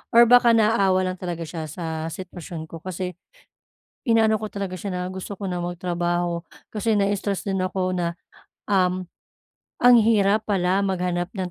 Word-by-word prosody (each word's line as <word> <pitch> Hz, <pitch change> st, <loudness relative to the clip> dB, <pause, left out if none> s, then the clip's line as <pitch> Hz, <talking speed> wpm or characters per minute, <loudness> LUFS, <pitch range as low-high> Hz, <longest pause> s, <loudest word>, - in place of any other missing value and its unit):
or 235 Hz, -, +10 dB
baka 240 Hz, 0 st, +6 dB
naawa 200 Hz, -4 st, +3 dB
lang 185 Hz, -, -9 dB
talaga 175 Hz, -2 st, -4 dB
siya 160 Hz, -1 st, -6 dB
sa 160 Hz, 0 st, -4 dB
sitwasyon 170 Hz, -2 st, -7 dB
ko 165 Hz, -, -7 dB
kasi 185 Hz, 0 st, -4 dB, 0.9 s
inaano 225 Hz, -2 st, +4 dB
ko 215 Hz, 0 st, -5 dB
talaga 195 Hz, -2 st, -4 dB
siya 200 Hz, +2 st, -5 dB
na 180 Hz, -, -2 dB
gusto 190 Hz, +2 st, -6 dB
ko 200 Hz, 0 st, -5 dB
na 180 Hz, -, -2 dB
magtrabaho, 175 Hz, -1 st, -2 dB, 0.2 s
kasi 220 Hz, +1 st, 0 dB
na-stress 200 Hz, -1 st, 0 dB
din 195 Hz, -1 st, -2 dB
ako 185 Hz, 0 st, -1 dB
na, 175 Hz, -2 st, -1 dB, 0.6 s
um, 185 Hz, -2 st, +2 dB, 0.8 s
ang 245 Hz, 0 st, +8 dB
hirap 215 Hz, -1 st, +3 dB
pala 190 Hz, -2 st, +1 dB
maghanap 180 Hz, -2 st, -1 dB
ng 185 Hz, -2 st, -3 dB
185 Hz, 155 wpm, -24 LUFS, 175-205 Hz, 0.9 s, or